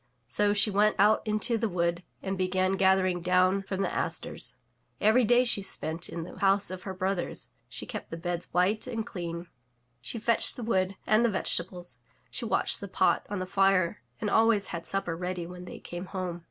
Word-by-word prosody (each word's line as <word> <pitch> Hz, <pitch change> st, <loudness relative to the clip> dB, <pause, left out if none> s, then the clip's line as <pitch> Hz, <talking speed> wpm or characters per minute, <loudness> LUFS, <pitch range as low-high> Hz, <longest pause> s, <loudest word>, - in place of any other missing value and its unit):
So 205 Hz, -, +2 dB
she 205 Hz, +1 st, +3 dB
went 210 Hz, +2 st, +3 dB
out 210 Hz, +2 st, +5 dB
into 215 Hz, +2 st, +1 dB
the 225 Hz, 0 st, 0 dB
wood 170 Hz, -1 st, 0 dB, 0.2 s
and 195 Hz, 0 st, -2 dB
began 185 Hz, 0 st, +1 dB
gathering 190 Hz, -2 st, +3 dB
down 185 Hz, +2 st, +3 dB
from 195 Hz, 0 st, -3 dB
the -, -, -2 dB
asters. -, -, -2 dB, 0.4 s
Every 220 Hz, +4 st, +4 dB
day 240 Hz, +3 st, +5 dB
she 230 Hz, -4 st, +2 dB
spent 165 Hz, -3 st, -1 dB
in 165 Hz, -, -5 dB
the 170 Hz, -, -10 dB
house 195 Hz, 0 st, +2 dB
of 185 Hz, -1 st, -6 dB
her 190 Hz, -, -5 dB
brothers; 185 Hz, -1 st, -2 dB, 0.2 s
she -, -, -5 dB
kept -, -, -6 dB
the 165 Hz, -, -5 dB
beds 175 Hz, 0 st, -3 dB
white 195 Hz, +7 st, +1 dB
and 225 Hz, -3 st, -3 dB
clean; 170 Hz, -5 st, -5 dB, 0.6 s
she 125 Hz, -, -6 dB
fetched 230 Hz, +1 st, +2 dB
the 245 Hz, -, -6 dB
wood 190 Hz, -4 st, +1 dB
and 215 Hz, +2 st, +4 dB
the 235 Hz, -, +4 dB
vegetables; 180 Hz, -2 st, -2 dB, 0.3 s
she -, -, -3 dB
watched -, -, +2 dB
the -, -, -5 dB
pot -, -, +2 dB
on 205 Hz, -, -2 dB
the 185 Hz, -, -2 dB
fire 195 Hz, -1 st, +2 dB, 0.2 s
and 210 Hz, -3 st, -2 dB
always 220 Hz, -2 st, +3 dB
had 170 Hz, -1 st, -4 dB
supper 195 Hz, -4 st, 0 dB
ready 180 Hz, 0 st, -3 dB
when 180 Hz, +1 st, -9 dB
they -, -, -8 dB
came 175 Hz, +2 st, -7 dB
home. 180 Hz, -3 st, -4 dB
190 Hz, 195 wpm, -29 LUFS, 180-210 Hz, 0.6 s, out